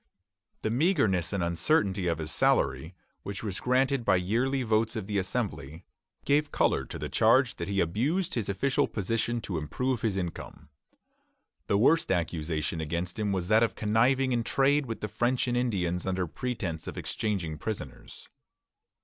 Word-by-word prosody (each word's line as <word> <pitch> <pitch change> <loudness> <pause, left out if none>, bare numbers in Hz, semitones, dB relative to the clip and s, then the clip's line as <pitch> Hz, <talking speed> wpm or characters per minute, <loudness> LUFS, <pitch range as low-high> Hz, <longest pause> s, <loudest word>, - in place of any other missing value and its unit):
The 110 - 0
meagreness 120 - +2
and 100 -3 -1
uncertainty 95 - +1
of 85 -2 +1
his 80 -1 -4
salary, 70 +6 +1 0.3
which 100 +1 -6
was 100 -3 -3
granted 130 +1 +1
by 95 - +4
yearly 120 +9 0
votes 110 0 +1
of 110 -4 -3
the 100 0 -1
Assembly, 85 - -3 0.4
gave 145 +1 +2
color - - +1
to - - -7
the - - -4
charge - - +3
that - - -4
he 100 0 -1
abused 140 - 0
his 115 -5 -2
official 130 +8 +1
position 115 +3 -1
to 95 -6 -3
improve 125 - -2
his 105 -4 0
income. 85 -4 -6 1.0
The 100 - +2
worst 160 +9 +3
accusation 80 -2 -1
against 85 +5 -3
him 105 -2 0
was 90 -2 -1
that 110 +1 +5
of 115 -1 +1
conniving 125 +5 +2
in 120 -1 +1
trade 135 +3 +2
with 115 - -5
the 105 - -2
French 120 +5 0
and 120 - 0
Indians 95 -8 -1
under 95 -1 0
pretence 95 -4 -4
of - - -6
exchanging 90 -8 -2
prisoners. 80 - -6
105 Hz, 165 wpm, -28 LUFS, 90-125 Hz, 1.0 s, that